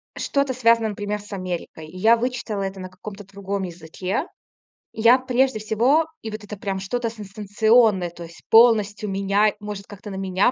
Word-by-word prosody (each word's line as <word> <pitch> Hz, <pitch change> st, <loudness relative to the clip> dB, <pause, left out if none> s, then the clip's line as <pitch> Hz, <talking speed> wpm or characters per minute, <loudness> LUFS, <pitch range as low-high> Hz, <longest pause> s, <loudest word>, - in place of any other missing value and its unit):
что-то 280 Hz, -2 st, 0 dB
связано, 230 Hz, -2 st, +3 dB
например, 205 Hz, 0 st, -3 dB
с 205 Hz, 0 st, -11 dB
Америкой. 175 Hz, -4 st, -5 dB
И 180 Hz, -, -12 dB
я 225 Hz, +5 st, +5 dB
вычитала 235 Hz, -4 st, -3 dB
это 195 Hz, 0 st, -5 dB
на 185 Hz, 0 st, -7 dB
каком-то 205 Hz, +2 st, -10 dB
другом 195 Hz, 0 st, -4 dB
языке. 180 Hz, -, -4 dB, 0.7 s
Я 235 Hz, +3 st, +5 dB
прежде 260 Hz, -1 st, +1 dB
всего 240 Hz, +9 st, +2 dB, 0.2 s
и 220 Hz, -, -5 dB
вот 215 Hz, 0 st, -7 dB
это 205 Hz, 0 st, -8 dB
прям 195 Hz, -1 st, -3 dB
что-то 230 Hz, +4 st, -2 dB
сенсационное, 210 Hz, -1 st, +2 dB
то 175 Hz, 0 st, -10 dB
есть 165 Hz, 0 st, -13 dB
полностью 215 Hz, -3 st, +5 dB
меняй 200 Hz, +2 st, +2 dB
может 205 Hz, -1 st, -7 dB
как-то 205 Hz, +1 st, -10 dB
на -, -, -6 dB
меня 190 Hz, +4 st, +1 dB
205 Hz, 170 wpm, -23 LUFS, 195-230 Hz, 0.7 s, я